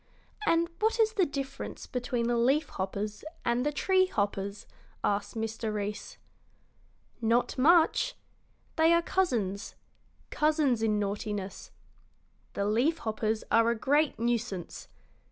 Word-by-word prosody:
"And 335 0 +3
what 445 +2 +1
is 445 0 +3
the 380 -6 +2
difference 275 -1 -5
between 245 -1 -2
the 240 0 +1
leaf 270 +6 +2
hoppers 200 +2 -4 0.2
and 235 +1 +1
the 295 - +1
tree 375 +5 +3
hoppers?" 200 - -2 0.4
asked 205 +2 -1
Mr. 225 0 -3
Reece. 210 0 -4 1.0
"Not 230 +2 +2
much. 335 - +4 0.6
They 325 +1 +5
are 335 0 +3
cousins 225 - -1 0.6
cousins 300 -6 +2
in 215 -1 +2
naughtiness. 205 -1 -4 0.8
The 200 - -1
leaf 245 +11 +2
hoppers 220 -3 -2
are 230 0 +5
a 235 - +1
great 290 +6 +2
nuisance. 230 -5 -2
235 Hz, 120 wpm, -29 LUFS, 210-305 Hz, 1.0 s, They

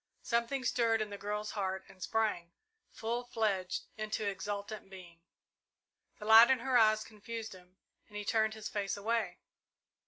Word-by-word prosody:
Something 235 +3 0
stirred 230 -3 +2
in 215 -1 -3
the 200 - -5
girl's 210 +1 -3
heart 190 -2 -3
and 185 - -17
sprang, 210 -7 -1 0.4
full 235 +2 -3
fledged, 210 -6 -1
into 215 0 -2
exultant 205 +1 -4
being. 175 -3 -12 1.0
The 210 - -9
light 225 +2 +9
in 265 - +5
her 260 0 0
eyes 215 -2 +5
confused 225 0 -7
him, 180 0 -17 0.3
and 210 - -9
he 210 - -5
turned 220 0 +2
his 215 -1 -6
face 200 -1 -2
away. 215 -3 -1
215 Hz, 155 wpm, -33 LUFS, 200-225 Hz, 1.0 s, light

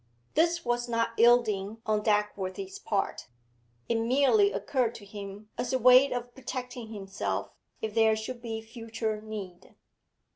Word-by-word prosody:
This 340 +1 +2
was 240 0 0
not 230 0 +1
yielding 225 -3 +3
on 215 -2 +1
Dagworthy's 210 - -1
part; 200 - -2 0.6
it 230 - +1
merely 280 - +4
occurred 250 - 0
to 205 - -10
him 200 +1 -9
as 250 - -1
a - - +4
way 255 +3 +7
of 245 0 -4
protecting 250 -2 -6
himself 195 -3 -4 0.3
if 220 -1 -2
there 220 -1 +4
should 235 +3 -6
be 225 -2 -5
future 225 -1 -4
need. 205 -5 -8
225 Hz, 140 wpm, -29 LUFS, 210-250 Hz, 0.6 s, way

